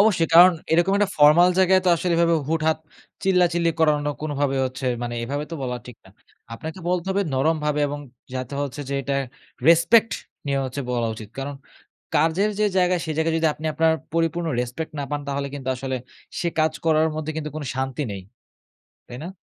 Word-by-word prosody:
অবশ্যই 200 -6 +3
কারণ 180 +2 +9 0.2
এরকম 175 +4 +3
একটা 205 -2 +1
ফরমাল 150 +4 +6
জায়গায় 190 0 +5
তো - - +3
আসলে 175 +1 -1
এভাবে 170 0 +3
হুট-হাট 160 -1 +1 0.4
চিল্লাচিল্লি 175 -3 +3
করানো 150 -2 +2
কোনোভাবে 145 -2 -1
হচ্ছে 130 +1 -5 0.2
মানে 120 0 -3
এভাবে 145 +4 -3
তো - - -4
বলা 125 -1 -2
ঠিক 125 -3 -11
না। 95 - -17 0.4
আপনাকে 160 +9 -7
বলতে 180 0 0
হবে 200 +1 +1
নরমভাবে 150 +1 +1
এবং 145 +1 -5 0.3
যাতে 130 +1 -4
হচ্ছে 145 0 -4
যে 140 - -2
এটা 140 +1 -2 0.5
রেসপেক্ট 170 +8 +5 0.3
নিয়ে 140 -1 0
হচ্ছে 130 +2 -4
বলা 120 -2 0
উচিত। 110 -1 -9
কারণ 140 +1 -4 0.6
কাজের 165 +7 +2
যে 215 - +4
জায়গা 180 0 +3
সে 160 - -5
জায়গায় 160 0 +1
যদি 160 - +3
আপনি 155 - -6
আপনার 160 +1 +3 0.2
পরিপূর্ণ 165 +1 0
রেসপেক্ট 125 +6 -4
না 140 - -2
পান 145 0 -2
তাহলে 140 0 -2
কিন্তু 135 -2 -6
আসলে 130 0 -3 0.4
সে 170 - 0
কাজ 155 0 +2
করার 160 -1 +3
মধ্যে 155 0 -3
কিন্তু 150 -1 -4
কোনো 145 - -5
শান্তি 130 +2 -2
নেই। 100 -1 -7 0.9
তাই 120 - -8
না? - - -5
155 Hz, 185 wpm, -23 LUFS, 140-170 Hz, 0.9 s, কারণ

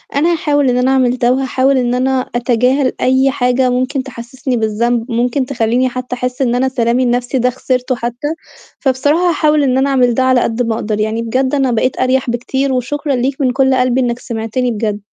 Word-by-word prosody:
أنا 325 +5 +2
هاحاول 290 -4 +1
إن 245 - +1
أنا 255 +1 +2
أعمل 255 -2 +2
ده 245 0 +2
وهاحاول 265 +1 +1
إن 245 -1 0
أنا 260 0 0
أتجاهل 250 +3 +1
أي 260 +1 +3
حاجة 250 -1 +1
ممكن 255 +2 -1
تحسّسني 255 0 -5
بالذنب، 230 +2 -1
ممكن 245 +3 0
تخلّيني 250 0 0
حتّى 250 0 -5
أحس 250 +2 -4
إن 245 -2 +1
أنا 265 +1 +1
سلامي 245 0 +1
النَفْسي 245 +1 0
ده 250 +1 +2
خِسرته 255 0 -2
حتّى، 240 +4 -4 0.5
فبصراحة 290 +6 +1
هاحاول 305 -2 +2
إن 260 -2 +1
أنا 270 +1 +2
أعمل 250 -3 +2
ده 260 - +1
على 255 -1 +3
قد 225 +2 -1
ما 230 -2 0
أقدر، 215 -1 -3
يعني 220 +2 -1
بجد 260 +4 0
أنا 270 -3 +1
بقيت 240 +2 0
أريَح 255 0 +1
بكتير 265 +3 -1
وشكرًا 280 +3 -2
ليك 265 +3 -2
من 260 -2 +2
كلّ 265 +1 +2
قلبي 255 0 +1
إنّك 240 -1 -1
سمعتني 235 +1 -3
بجد. 210 -2 -2
255 Hz, 200 wpm, -15 LUFS, 240-265 Hz, 0.5 s, أي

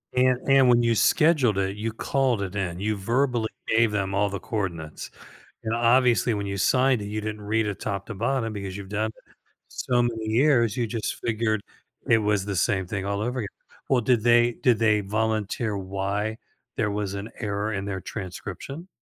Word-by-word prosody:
And 125 0 +3
and 135 -2 +6
when 120 0 +5
you 115 -1 +2
scheduled 140 - +3
it, 95 0 0
you 110 +1 -2
called 125 -1 0
it 95 0 -4
in. 90 -3 -2
You 105 +2 0
verbally 120 +2 0 0.2
gave 110 -1 +3
them 95 -1 -1
all 100 0 +2
the 100 -1 -4
coordinates. 85 -9 -4 0.5
And 115 +1 -1
obviously 120 -1 +3
when 100 -1 -2
you 100 0 -3
signed 130 +3 +3
it, 100 - -5
you 105 +1 -3
didn't 105 0 -5
read 110 +2 0
it 100 - -4
top 100 -1 -3
to 115 - -5
bottom 115 +1 -1
because 100 -1 -5
you've 100 - -8
done 105 +2 0 0.2
it - - -26 0.3
so 125 -1 0
many 115 -2 -1
years 120 -1 +3
you 120 - 0
just 110 -1 -3
figured 110 -2 0 0.5
it 115 - +6
was 105 -2 +1
the 100 -2 -3
same 95 0 +1
thing 95 0 -3
all 100 0 -1
over 125 +3 -2
again. 105 - -2 0.4
Well, 130 -2 +3
did 120 -1 +2
they 120 0 +5
did 120 -2 +2
they 110 -2 +3
volunteer 110 +1 -1
why 100 +3 -2 0.4
there 105 -2 +1
was 100 -1 -2
an 100 +2 -5
error 105 +1 -2
in 100 -1 -3
their 100 -1 -3
transcription? 105 - -7
110 Hz, 195 wpm, -25 LUFS, 100-120 Hz, 0.5 s, and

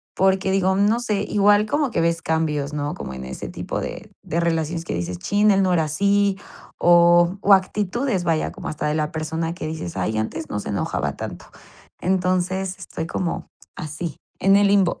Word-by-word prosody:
porque 190 0 +2
digo, 190 0 +2
no 210 +4 +3
sé, 210 -4 -1
igual 205 +1 +4
como 285 +3 0
que - - -1
ves 165 0 +1
cambios, 155 -3 -1
¿no?, 145 0 -2
como 65 - -7
en 65 0 -7
ese 65 - -6
tipo - - -4
de - - -7
de 165 - -2
relaciones 165 0 -1
que - - -3
dices: 90 0 -3
"Chin, 205 - +3
él 195 0 +3
no 185 -1 +2
era 165 -3 +2
así", 200 +5 +2 0.4
o 175 +1 +5
o 200 - +6
actitudes, 200 +3 +1
vaya, 165 -2 0
como - - -6
hasta 155 - -3
de 150 - 0
la 155 -1 -1
persona 160 +1 -3
que 165 -3 -6
dices: 155 - -5
"Ay, 100 +4 -1
antes 155 +9 -3
no 105 - -2
se - - -7
enojaba 100 - -2
tanto". - - -7 0.5
Entonces, 185 +1 0
estoy 160 -3 -5
como 175 0 -3 0.3
así, 155 -1 -5 0.2
en 195 +1 +4
el 200 0 +5
limbo. 195 -3 +3
175 Hz, 190 wpm, -22 LUFS, 155-195 Hz, 0.5 s, o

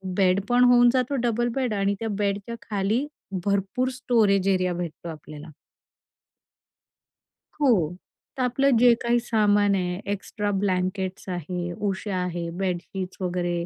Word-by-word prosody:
Bed 190 -1 +3
पण 245 +1 +4
होऊन 245 -1 +6
जातो 255 +2 +1
डबल 240 0 +1
बेड 255 -5 0
आणि 200 0 +1
त्या 225 - -3
बेडच्या 200 +2 -2
खाली 210 +6 0 0.4
भरपूर 200 +6 0
स्टोरेज 220 -6 +2
एरिया 185 -2 +2
भेटतो 170 -1 -6
आपल्याला. 155 0 -9 2.1
हो. 180 - +3 0.4
तर 255 - 0
आपलं 255 0 +2
जे 240 0 +6
काही 240 0 +2
सामान 205 -3 +2
आहे 180 -1 -2
एक्स्ट्रा 205 +1 -3
ब्लँकेट्स 190 -1 -1
आहे, 175 0 -4
उशा 195 0 -3
आहे, 170 -1 -3
बेडशीट्स 185 +1 -4
वगैरे 175 -1 -1
200 Hz, 125 wpm, -25 LUFS, 180-235 Hz, 2.1 s, होऊन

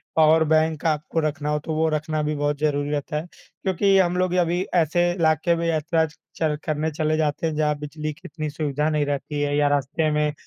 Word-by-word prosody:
power 160 0 +5
bank 155 0 +1
आपको 155 0 0
रखना 150 0 -3
हो 150 0 +1
तो 160 - -2
वो 160 +1 +2
रखना 155 0 -1
भी 150 0 -1
बहुत 145 0 -1
ज़रूरी 145 -1 0
रहता 150 0 -3
है 155 - -3 0.4
क्योंकि 195 +1 +3
हम 180 -1 +2
लोग 185 -1 +1
अभी 175 +2 0
ऐसे 175 +1 +3
इलाके 170 0 +2
में 170 0 -2
यात्रा 160 0 +1 0.3
चल 155 -2 0
करने 155 0 -1
चले 155 0 0
जाते 155 +1 0
हैं 155 - -3
जहाँ 150 -1 +1
बिजली 150 +1 -5
कि 155 - -23
इतनी 155 -4 -4
सुविधा 150 0 -1
नहीं 150 -2 +1
रहती 145 +1 -3
है 145 0 0
या 145 0 +3
रास्ते 145 +3 0
में 150 0 +1
155 Hz, 210 wpm, -23 LUFS, 150-160 Hz, 0.4 s, power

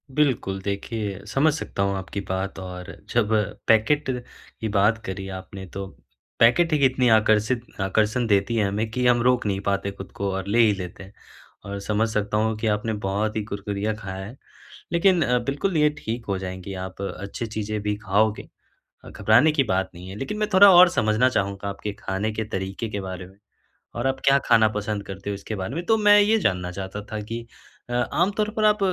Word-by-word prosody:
बिल्कुल 125 -10 +1
देखिए, 100 0 -3
समझ 145 +7 +2
सकता 100 -9 -3
हूँ 100 0 0
आपकी 95 +1 -5
बात 95 +1 -3
और 90 -1 -7 0.2
जब 110 -2 +1 0.3
पैकेट 130 +6 +3 0.5
की 110 - -1
बात 105 +2 +3
करी 95 0 -5
आपने 95 0 -10
तो 100 0 -4 0.5
पैकेट 155 +8 +5
ही - - +4
इतनी 130 -1 +2
आकर्षित 110 +2 +3 0.2
आकर्षण 110 +5 +1
देती 105 +2 +2
है 105 -3 +2
हमें 105 +3 -2
कि 125 +2 -1
हम 120 -1 +4
रोक 125 -2 +2
नहीं 100 -1 0
पाते 100 0 -1
खुद 95 -1 -10
को 100 -1 -2
और 95 0 -4
ले 110 +4 +2
ही 110 -3 +6
लेते 90 0 -7
हैं। 95 - -15 0.5
और 100 0 -5
समझ 105 +2 0
सकता 105 0 -1
हूँ 110 +1 +1
कि 110 0 -2
आपने 110 +1 0
बहुत 105 +3 -1
ही 110 - -1
कुरकुरिया 100 +1 -3
खाया 95 -2 -7
है। 110 +6 -10 0.6
लेकिन 175 +1 +4 0.3
बिल्कुल 155 +6 -1
ये 150 0 +4
ठीक 115 +1 -4
हो 100 -1 0
जाएँगी 95 +1 -6
आप 95 +1 -9
अच्छी 100 +4 -5
चीज़ें 110 -1 -3
भी 105 0 0
खाओगे। 105 +1 0 0.6
अ, - - -10
घबराने 110 +10 +4
की 145 -3 +3
बात 95 -4 0
नहीं 90 +2 -10
है 95 - -7
लेकिन 135 - -4
मैं 210 -1 0
थोड़ा 200 +1 +9
और 180 +1 +9
समझना 110 +1 +2
चाहूँगा 100 -4 -2
आपके 100 +1 -5
खाने 100 +3 -2
के 110 +1 -3
तरीके 95 +2 -4
के 100 - -3
बारे 95 -1 -6
में 95 - -18 0.6
और 120 - -1
आप 135 0 0
क्या 140 0 +6
खाना 110 -1 +5
पसंद 105 -1 -3
करते 100 +1 -6
हो 100 - -2
इसके 105 +2 -6
बारे 95 +6 -4
में। 170 +2 -3
तो 225 - +4
मैं 205 -1 +6
ये 215 +2 +4
जानना 90 - 0
चाहता 95 +2 -6
था 110 - -2
कि 115 +2 -6 0.4
अ, - - -4 0.2
आम 175 +3 +2
तौर 215 0 +1
पर 215 - +1
आप 210 0 +4
105 Hz, 205 wpm, -24 LUFS, 100-120 Hz, 0.6 s, थोड़ा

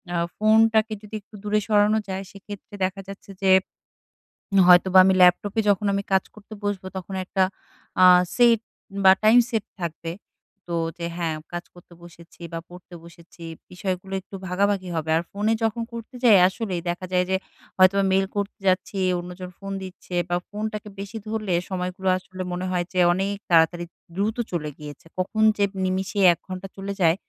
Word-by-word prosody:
আ - - +1 0.2
ফোনটাকে 220 0 +4
যদি 210 0 -9
একটু 210 - -17
দূরে 210 0 +1
সরানো 210 0 +3
যায় 190 +1 -3
সেক্ষেত্রে 205 0 -11
দেখা 190 +1 -2
যাচ্ছে 195 0 -10
যে 190 -1 +3 1.2
হয়তোবা 185 +1 +7
আমি 190 - +4
ল্যাপটপে 185 +4 +4
যখন 205 +1 +2
আমি 200 0 -1
কাজ 190 -1 +3
করতে 215 0 -13
বসবো 200 -2 -3
তখন 190 +1 -7
একটা 190 +1 +1 0.6
আ - - +9 0.3
সেট 235 -2 +5 0.4
বা 190 - +10
টাইম 220 +3 +6
সেট 220 -3 -1 0.2
থাকবে। 165 0 -4 0.6
তো 170 - -1 0.2
যে 170 - -4
হ্যাঁ, 165 -2 -1 0.2
কাজ 175 0 -4
করতে 175 0 -17
বসেছি 170 0 -16
বা 165 - -3
পড়তে 180 0 -13
বসেছি 170 0 -15 0.3
বিষয়গুলো 185 +1 -4
একটু 195 - -12
ভাগাভাগি 190 0 0
হবে। 160 -1 -3
আর 165 - -1
ফোনে 210 +2 0
যখন 225 +1 0
করতে 230 +2 -8
যাই 225 -5 +7
আসলেই, 190 -3 -3
দেখা 175 +2 -3
যায় 180 0 +2
যে 190 - +2 0.4
হয়তোবা 190 +1 +5
মেইল 195 +1 +3
করতে 205 +2 -3
যাচ্ছি, 185 +2 +1 0.2
অন্যজন 180 +1 -8
ফোন 195 0 -7
দিচ্ছে 185 -1 -9
বা 175 - +1
ফোনটাকে 210 0 -5
বেশি 200 +3 -6
ধরলে 215 -3 -2 0.2
সময়গুলো 185 0 -4
আসলে 185 0 -9
মনে 180 +1 -3
হয় 175 -1 0
যে 185 - 0
অনেক 195 +3 -1
তাড়াতাড়ি 170 0 +3 0.3
দ্রুত 205 +3 0 0.2
চলে 160 -4 -2
গিয়েছে। 150 -1 -10
কখন 215 +4 0
যে 205 - +2 0.2
নিমিষে 190 +2 -2
১ - - -12
ঘন্টা 185 0 -6
চলে 195 +1 -4
যায় 165 -1 +5
190 Hz, 170 wpm, -24 LUFS, 180-205 Hz, 1.2 s, বা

